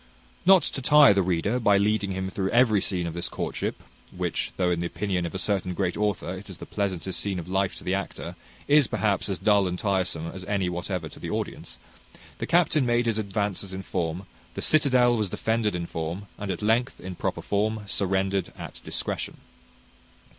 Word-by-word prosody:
Not 190 -2 +8
to 135 - -2
tire 145 -4 +7
the 100 - +3
reader, 95 +6 0
by 105 -4 +4
leading 100 0 +1
him 95 0 -3
through 95 0 -1
every 115 -3 +4
scene 90 -3 0
of 85 - -4
this 85 +1 -2
courtship - - -3 0.3
(which, - - -2
though 90 -1 +2
in 85 - 0
the 85 - -1
opinion 90 -1 -2
of 85 - -8
a - - 0
certain 95 -1 -1
great 90 -2 0
author, 105 -4 -1
it 105 - -12
is 95 - -7
the - - -8
pleasantest 95 -2 -2
scene 100 -2 -1
of 85 -1 -5
life 95 +1 0
to - - -10
the 90 - -1
actor, 100 0 -4 0.3
is, 145 -3 +5
perhaps, 100 -2 0
as 95 - -1
dull 100 -3 +3
and 90 0 -2
tiresome 90 -5 0
as 95 +2 -7
any 100 -3 0
whatever 90 -1 -3
to - - -12
the - - -5
audience), - - -4 0.6
the - - -3
captain 165 -3 +3
made 120 0 +2
his 115 -2 +1
advances 100 -2 -2
in 95 0 -5
form, 90 0 -3 0.3
the - - -4
citadel 130 -6 +5
was 105 -4 0
defended 110 0 0
in 85 -1 -2
form, 85 +4 -4
and 100 - -4
at 95 +1 -3
length, 115 +4 +1
in 95 0 -6
proper - - -3
form, 110 +2 0
surrendered 95 -1 0
at - - -8
discretion. - - -3
100 Hz, 200 wpm, -26 LUFS, 90-110 Hz, 0.6 s, Not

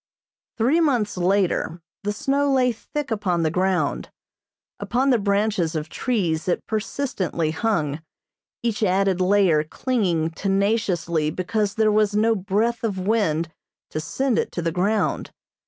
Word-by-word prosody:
Three 255 +8 +3
months 245 -10 +1
later 180 -2 +1 0.2
the 205 - -1
snow 275 +6 0
lay 255 -2 +3
thick 245 +6 -5
upon 185 -6 0
the 155 - +1
ground. 185 +1 0 0.7
Upon 265 +3 +1
the 245 - +3
branches 200 -4 0
of 155 0 -3
trees 175 -11 -1
it 180 - 0
persistently 215 - -2
hung, 160 -6 -1 0.6
each 230 -2 -1
added 190 -2 +2
layer 185 -5 +4
clinging 170 -4 -1
tenaciously 195 -4 0
because 200 +5 -1
there 220 -1 +3
was 210 -1 +2
no 225 +2 +3
breath 220 +4 -1
of 210 -4 -1
wind 185 -5 0 0.4
to 155 - -2
send 235 - 0
it - - -2
to 175 - -3
the 165 - 0
ground. 200 +6 0
200 Hz, 140 wpm, -23 LUFS, 175-225 Hz, 0.7 s, layer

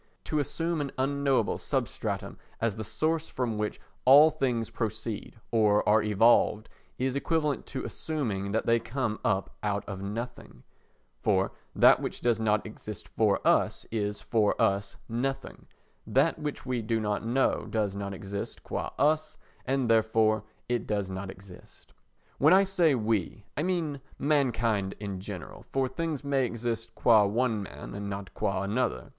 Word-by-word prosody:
To 155 - -1
assume 165 +3 -1
an 140 -2 -3
unknowable 135 -3 +1
substratum - - -3 0.2
as 115 -3 0
the 110 - -4
source 160 +8 -1
from 115 -4 -2
which 105 0 -2 0.2
all 145 +5 +8
things 125 -7 -1
proceed 110 -1 -4 0.2
or 105 -2 +3
are 105 +1 +5
evolved 110 +1 +3 0.3
is 130 +1 -1
equivalent 150 0 0
to 130 - -5
assuming 110 -11 -2
that 110 - 0
they 115 0 +4
come 115 -1 -2
up 95 -2 0
out 100 -1 -1
of 95 -2 -5
nothing; 115 +5 -6 0.6
for 95 -2 +2 0.2
that - - +7
which - - -4
does 120 -2 +1
not 105 -1 +1
exist 105 -2 -8
for 105 -3 +1
us - - +2
is 105 -2 -2
for 110 -3 +1
us 100 0 +1
nothing; 135 +3 -3 0.4
that - - +2
which 150 -3 -4
we 125 -2 -1
do 115 +1 0
not 105 -1 -1
know 125 +4 +1
does 105 -3 -1
not 100 0 -4
exist 100 +1 -6
qua - - -3
us, 155 +1 +1 0.3
and 135 -1 +1
therefore 110 -1 +3 0.2
it 120 -1 -1
does 100 -3 -1
not 95 +1 -5
exist. 95 -1 -14 0.5
When 155 +6 +7
I 195 - +6
say 180 -7 +3
"we," 110 -3 -1
I 150 - -1
mean 160 -5 -1 0.2
mankind 115 -9 +1 0.2
generally, 95 -3 -8
for 135 -1 +1
things 150 +2 -3
may 135 -3 +1
exist 115 -1 -4
qua 110 -3 +6
one 110 +1 +1
man 75 -7 -8
and 100 0 -5
not 100 -1 -6
qua 95 -1 -1
another. 105 - -1
115 Hz, 155 wpm, -29 LUFS, 105-135 Hz, 0.6 s, all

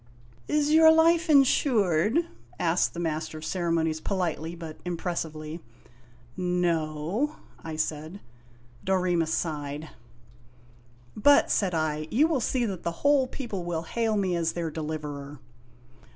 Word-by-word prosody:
" 120 0 -27
Is 300 0 +1
your 320 0 +8
life 330 +1 +4
insured? 240 - +3 0.2
" 120 +1 -27
asked 175 +1 +1
the - - -4
Master 155 -1 -3
of 155 - -7
Ceremonies 165 -3 0
politely 170 -4 -2
but 165 -2 -8
impressively. 165 -3 -4 0.8
"No," 180 - -1 0.3
I 160 -1 -5
said. 155 +4 -3 0.6
Dorema 180 -3 +1
sighed. 150 -2 -3 1.3
"But," 285 +7 +5
said 185 -4 +1
I, 155 -1 -1
"you 280 +7 +3
will 305 -6 0
see 245 +1 0
that 190 -5 -4
the 170 - -2
whole 285 -2 +4
people 230 -9 -5
will 170 -2 -3
hail 220 +5 -1
me 190 -3 0
as 165 -1 0
their 170 -2 -3
deliverer." 150 -2 -5
170 Hz, 130 wpm, -27 LUFS, 155-220 Hz, 1.3 s, your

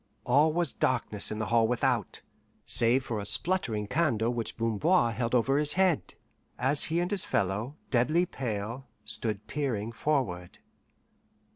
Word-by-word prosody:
All 145 +5 +4
was 170 -1 -1
darkness 115 -5 -1
in 110 - -4
the 110 - -2
hall 115 0 +2
without, 125 -3 -1 0.4
save 125 +3 +3
for 110 -4 -3
a - - -4
spluttering 120 - +3
candle 120 -4 0
which 115 -2 -4
Bamboir 115 - +2
held 115 +2 -1
over 135 +4 +2
his 150 0 +4
head, 180 - +1 0.4
as 135 +3 +1
he 165 +1 -1
and 175 +2 -2
his 200 -3 -1
fellow, 105 +8 -2 0.2
deadly 150 +8 +2
pale, 120 - -5 0.2
stood 110 -1 -1
peering 115 -7 -3
forward. 115 -10 -2
120 Hz, 145 wpm, -28 LUFS, 110-150 Hz, 0.4 s, All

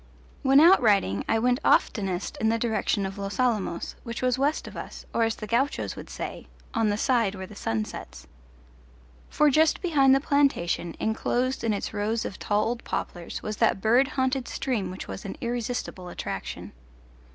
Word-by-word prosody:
When 270 0 +6
out 340 +3 +7
riding 195 - +2
I 225 - +3
went 245 +3 +2
oftenest 190 -3 +1
in 220 - +3
the 230 - +2
direction 220 -3 0
of 190 +1 -6
Los 200 +3 -5
Alamos, 220 -9 0
which 235 0 -6
was 255 0 +2
west 290 +3 0
of - - -10
us, - - -8
or - - +1
as 225 - -1
the 215 - -7
gauchos 245 +7 0
would - - -9
say, - - -6 0.3
"on 225 -2 +2
the 205 - 0
side 230 -5 +2
where 190 -1 -6
the 210 - -13
sun 110 - -1
sets." - - -9 1.0
For 300 -1 +3
just 310 +3 +4
behind 275 -7 +4
the - - +3
plantation, 275 - +1
enclosed 245 +4 0
in 230 - +1
its 205 - -3
rows 220 +2 -1
of 190 - -6
tall 205 0 +1
old 235 +1 -2
poplars, 175 -1 -5
was 215 0 -4
that 225 -4 +2
bird 240 +6 +4
haunted 260 -1 0
stream 225 -9 -2
which 185 +1 -7
was - - -7
an 200 - -6
irresistible 235 -6 -3
attraction. - - -5
225 Hz, 185 wpm, -26 LUFS, 200-260 Hz, 1.0 s, out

